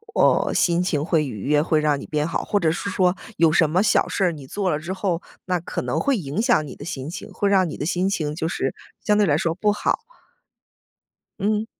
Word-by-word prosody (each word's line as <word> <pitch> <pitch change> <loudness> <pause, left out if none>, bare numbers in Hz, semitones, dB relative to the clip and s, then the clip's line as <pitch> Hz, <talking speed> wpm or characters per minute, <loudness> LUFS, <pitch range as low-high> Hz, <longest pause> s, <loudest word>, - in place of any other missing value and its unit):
哦， - - +3
心 175 0 +2
情 150 -5 0
会 160 -3 +2
愉 110 -8 -6
悦， 150 +1 +3
会 155 -1 +2
让 150 -1 +2
你 - - -8
变 150 0 -1
好。 165 - -2
或 205 - 0
者 165 -4 +2
是 200 - -3
说 185 -1 +2 0.2
有 165 -2 +4
什 160 -2 +4
么 180 +5 +2
小 210 - +2
事 195 - +1
儿 175 - +2
你 145 -4 -10
做 195 +7 -2
了 150 - +1
之 170 +4 -6
后， 190 -3 -1 0.2
那 185 -1 +1
可 - - -4
能 - - -2
会 275 -4 +1
影 155 +4 -2
响 235 - +2
你 130 - -9
的 - - -10
心 145 -5 -5
情， 170 - -8
会 205 - -1
让 190 -3 +3
你 - - -6
的 145 - -3
心 180 +3 0
情 155 -6 -2
就 160 0 -2
是 135 - -2 0.3
相 210 -1 +2
对 210 - +4
来 150 -4 +3
说 165 0 -1
不 210 +2 +2
好。 210 - 0 1.4
嗯。 210 +2 0
170 Hz, 260 characters per minute, -23 LUFS, 150-195 Hz, 1.4 s, 有